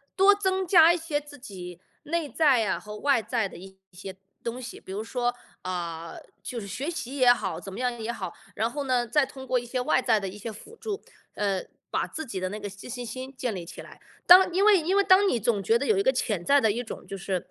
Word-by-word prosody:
多 390 +2 +7
增 380 -2 0
加 335 -2 +7
一 - - -1
些 320 -3 -2
自 290 -1 -14
己 180 -7 -9 0.2
内 320 -1 -2
在 275 -8 +3
啊 - - 0
和 210 0 -9
外 275 -5 +2
在 225 -5 -1
的 - - -11
一 190 +2 -12 0.2
些 190 +1 -9 0.3
东 235 +2 -4
西。 250 - -8
比 190 - -11
如 210 +3 -3
说， 245 +1 -1 0.3
呃， 170 -2 -4 0.3
就 240 -2 -5
是 200 - -8
学 250 +9 -4
习 315 -5 -4
也 250 -2 +7
好， 200 -6 -4
怎 195 - -9
么 210 - -7
样 245 -2 -1
也 225 +1 -3
好， 190 -7 -5 0.2
然 225 +2 0
后 285 +4 -4
呢， 250 -3 +1
再 295 +4 +3
通 265 0 -11
过 255 - +2
一 245 - -3
些 250 +1 -2
外 250 - +2
在 240 -4 +2
的 195 - -4
一 200 - -10
些 225 +2 -6
辅 220 - -13
助， 425 -3 -5 0.3
呃， 195 -3 -1 0.3
把 - - 0
自 315 - -6
己 230 -10 -5
的 185 0 -2
那 210 +2 -5
个 205 -1 -5
自信心 245 +6 -7
建 245 -5 -3
立 175 -2 -6
起 - - -9
来。 - - -14 0.3
当 365 0 +8
因 390 +3 +3
为 420 -2 +7
因 350 +4 0
为 400 - +5
当 390 +2 +6
你 245 - +1
总 210 -2 0
觉 460 +1 +3
得 - - -2
有 435 -3 +3
一 395 - +2
个 - - +4
潜 210 -8 -1
在 285 0 +5
的 220 - +3
一 240 +4 -3
种 225 - -9
就 195 - -6
是， 185 -1 -3
245 Hz, 280 characters per minute, -27 LUFS, 200-295 Hz, 0.3 s, 当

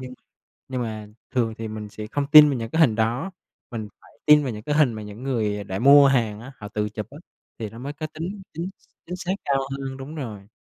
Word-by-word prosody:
nhưng 130 -1 -8 0.5
nhưng 130 -2 -2
mà 110 -2 -5 0.2
thường 115 -3 0
thì 110 -1 -4
mình 110 -1 -6
sẽ 105 +1 -7
không 140 +5 -2
tin 150 -1 +11
vào 135 -4 -1
những 115 0 -5
cái 160 - 0
hình 115 -8 +5
đó, 115 - 0 0.4
mình 110 -3 -5
phải - - -20
tin 150 0 +8
vào 130 - -2
những 105 -1 -7
cái 145 - -1
hình 145 -6 +4
mà 110 - -6
những 105 +3 -9
người 105 -6 -1
đã 95 0 -4
mua 140 +3 +8
hàng 115 -6 +1
á 130 +4 -10
họ 105 - -8
tự 105 0 -2
chụp 105 0 -6
á, 145 - -11 0.4
thì 110 -3 -4
nó 115 - -11
mới 140 +4 -5
có 155 +1 -5
tính 185 +5 -5
chính 170 +4 -4 0.4
chính 180 +1 -5
xác 180 +1 -2
cao 140 -1 +2 0.2
hơn. 135 -1 -5
Đúng 135 +3 -8
rồi. 110 -9 -7
125 Hz, 250 wpm, -24 LUFS, 110-145 Hz, 0.5 s, tin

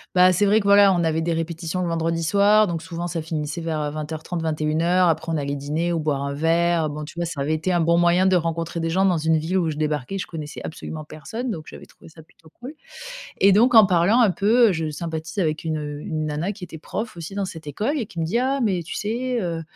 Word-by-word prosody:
Bah, 180 0 +6
c'est 195 +4 +2
vrai 210 +2 +4
que 200 - -5
voilà 200 -1 +6
on 170 -1 +1
avait 160 0 0
des 170 +1 0
répétitions 165 +2 -3
le 175 - -1
vendredi 165 0 -1
soir 205 +5 +4
donc 170 -2 -4
souvent 170 0 -5
ça 165 -1 -4
finissait 155 0 -4
vers, 160 -2 -2
heu, 150 - -2
20:30 155 +3 -5
21:00 160 +3 +1
Après 160 0 0
on 160 - 0
allait 140 -1 -2
dîner 150 +5 -2
ou 170 - 0
boire 150 -3 -1
un 140 0 -3
verre, 165 +1 +2
bon 150 +1 -6
tu 150 - -10
vois 170 - -1
ça 160 -4 -5
avait 150 +3 0
été 160 +4 -2
un 175 - +2
bon 170 +1 +3
moyen 175 +2 +4
de 190 - +4
rencontrer 165 0 -2
des 165 0 -1
gens 190 +3 +2
dans 180 - +2
une 160 +1 +2
ville 165 +5 -1
où 165 -3 +1
je - - -6
débarquais, 150 +3 -2
je - - -4
connaissais 155 -3 -7
absolument 155 0 -7
personne 225 - -6
donc 160 -8 -5
j'avais - - -11
trouvé - - -17
ça 160 0 -15
plutôt 160 0 -22
cool. 260 +5 -7 0.7
Et 195 0 +6
donc 240 +5 +4
en 220 -2 +9
parlant 185 +5 +3
un 230 - +5
peu, 195 +2 -3 0.2
heu, - - +2
je 160 -2 -2
sympathise 160 +4 -5
avec 155 -3 -1
une 160 -1 -2 0.3
une 155 -1 -3
nana 155 +6 -2
qui 190 -3 -8
était 165 -1 -10
prof 215 +6 -5
aussi 170 +3 -8
dans 200 -1 -2
cette 165 -4 -9
école 215 - -2
et 245 - -2
qui 175 -4 -9
me 160 - 0
dit: 180 +9 0
«Ah, 270 +2 0
mais 190 -7 0
tu - - -7
sais 240 +3 -2
heu, 170 -3 -3
165 Hz, 260 wpm, -23 LUFS, 155-190 Hz, 0.7 s, en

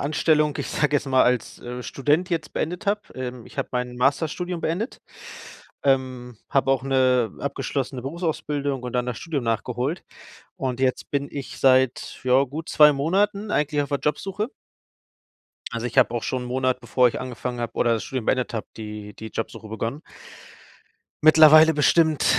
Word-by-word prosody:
Anstellung 150 0 +2
ich - - -3
sage 150 -1 +1
jetzt 140 - -3
mal, 130 -1 +4
als, 125 -2 0
äh, 125 0 -7
Student 150 +7 0
jetzt 160 -3 -2
beendet 175 +5 -3
habe. 205 +1 +1
Ähm, 125 -2 -6
ich - - -15
habe - - -1
mein 125 0 -3
Masterstudium 160 +7 0
beendet, 180 - -3 0.8
ähm, 130 -3 0
habe 135 -1 +2
auch 135 - 0
'ne 130 -4 +2
abgeschlossene 135 -2 -3
Berufsausbildung 145 -3 -2
und 125 -1 -5
dann 125 0 0
das 125 -2 -4
Studium 150 -6 -3
nachgeholt. 125 - -2 0.5
Und 130 -1 -3
jetzt 130 -1 0
bin 140 0 -1
ich 130 -4 -7
seit, 130 -1 +2
ja, 130 +1 +4
gut 150 +5 -7
2 150 -1 +7
Monaten 200 +8 0
eigentlich 150 0 +1
auf 145 - -7
der 140 - -1
Jobsuche. 195 - -2 1.2
Also, 115 0 -3
ich 125 +2 -5
habe 120 -3 +5
auch 115 - -2
schon 130 -1 -2
'n - - -7
Monat, 130 0 0
bevor 125 +1 +3
ich - - -6
angefangen 125 -1 -5
habe 120 -1 -4
oder 120 -1 +2
das 110 -3 -2
Studium 130 -4 -4
beendet 125 -2 0
habe, 110 - -4
die 105 -1 -7
die 110 - -8
Jobsuche 110 0 -6
begonnen. 115 +6 -4 1.2
Mittlerweile 155 0 +8
bestimmt 155 0 +3
135 Hz, 170 wpm, -24 LUFS, 125-150 Hz, 1.2 s, Mittlerweile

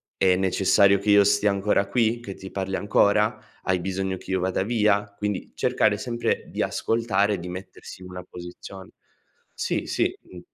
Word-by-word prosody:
è 95 -1 +3
necessario 95 +1 +3
che 100 +2 -3
io 100 0 +7
stia 105 +1 +3
ancora 100 0 +1
qui? 115 +2 +1
Che 100 -5 -7
ti 95 - -10
parli 95 0 -3
ancora? 105 +1 +2 0.3
Hai 95 -1 +1
bisogno 95 +1 -2
che - - -9
io 95 - +1
vada 95 +1 0
via?" 105 -2 +2
Quindi 105 -2 -3
cercare 105 -1 +2
sempre 120 +2 -2
di - - -4
ascoltare 105 -3 +1
e 100 - -3
di 90 +1 -7
mettersi 90 0 -9
una 90 0 -8
posizion 90 +2 -10 0.7
sì, - - -2
sì, - - 0
mh. 90 - -13
100 Hz, 170 wpm, -24 LUFS, 95-105 Hz, 0.7 s, io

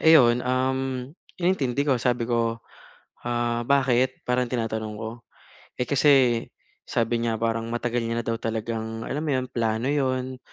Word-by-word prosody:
eh 160 0 +8
iyon, 120 -3 +5
um, 130 0 -1 0.3
inintindi 145 -7 +1
ko 135 -3 +3
sabi 120 0 +1
ko, 115 -1 0 0.7
ah, 120 0 0
"Bakit?" 130 -2 +2
Parang 125 0 +1
tinatanong 110 -3 -2
ko. 110 0 -4 0.7
Eh, 125 - 0
kasi 130 -5 +4 0.5
sabi 115 0 +1
niya 115 -1 0
parang 115 0 -1
matagal 120 0 -1
niya 115 0 -1
na - - -6
daw 115 - +1
talagang 115 0 -3
alam 150 - -2
mo 155 - -1
iyon, 130 0 0
plano 115 0 0
iyon, 130 -2 -1
120 Hz, 155 wpm, -25 LUFS, 115-130 Hz, 0.7 s, eh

